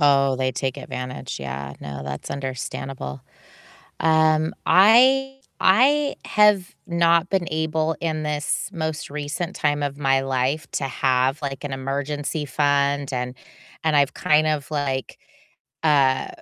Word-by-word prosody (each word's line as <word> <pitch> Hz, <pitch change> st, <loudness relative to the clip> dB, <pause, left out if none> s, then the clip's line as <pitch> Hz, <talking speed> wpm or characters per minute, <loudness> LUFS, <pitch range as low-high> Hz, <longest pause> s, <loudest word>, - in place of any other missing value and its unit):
Oh, 140 Hz, -2 st, +4 dB
they 130 Hz, 0 st, 0 dB
take 130 Hz, +1 st, -2 dB
advantage, 125 Hz, -, -6 dB
yeah, 70 Hz, +1 st, -5 dB
no, 70 Hz, -1 st, -7 dB
that's 70 Hz, 0 st, -6 dB
understandable. 130 Hz, -, -5 dB, 0.8 s
Um, 160 Hz, 0 st, +3 dB
I 260 Hz, +7 st, +5 dB, 0.2 s
I 275 Hz, +9 st, +4 dB
have 210 Hz, -3 st, +3 dB
not 170 Hz, 0 st, +3 dB
been 190 Hz, -3 st, 0 dB
able 160 Hz, 0 st, 0 dB
in 155 Hz, -2 st, -2 dB
this 150 Hz, +3 st, -2 dB
most 160 Hz, -2 st, -4 dB
recent 150 Hz, +3 st, -4 dB
time 145 Hz, -1 st, 0 dB
of 140 Hz, -1 st, -3 dB
my 135 Hz, -2 st, +2 dB
life 135 Hz, +3 st, -1 dB
to -, -, -2 dB
have, 130 Hz, +1 st, +1 dB
like, 135 Hz, -1 st, -5 dB
an 145 Hz, -, -4 dB
emergency 145 Hz, +3 st, -3 dB
fund 140 Hz, 0 st, +1 dB
and 125 Hz, 0 st, -3 dB, 0.5 s
and 155 Hz, -2 st, +2 dB
I've 140 Hz, -1 st, +3 dB
kind 155 Hz, +1 st, +2 dB
of 150 Hz, -2 st, -1 dB
like, 140 Hz, -3 st, -3 dB, 0.6 s
uh 140 Hz, -4 st, +3 dB
145 Hz, 130 wpm, -23 LUFS, 135-160 Hz, 0.8 s, I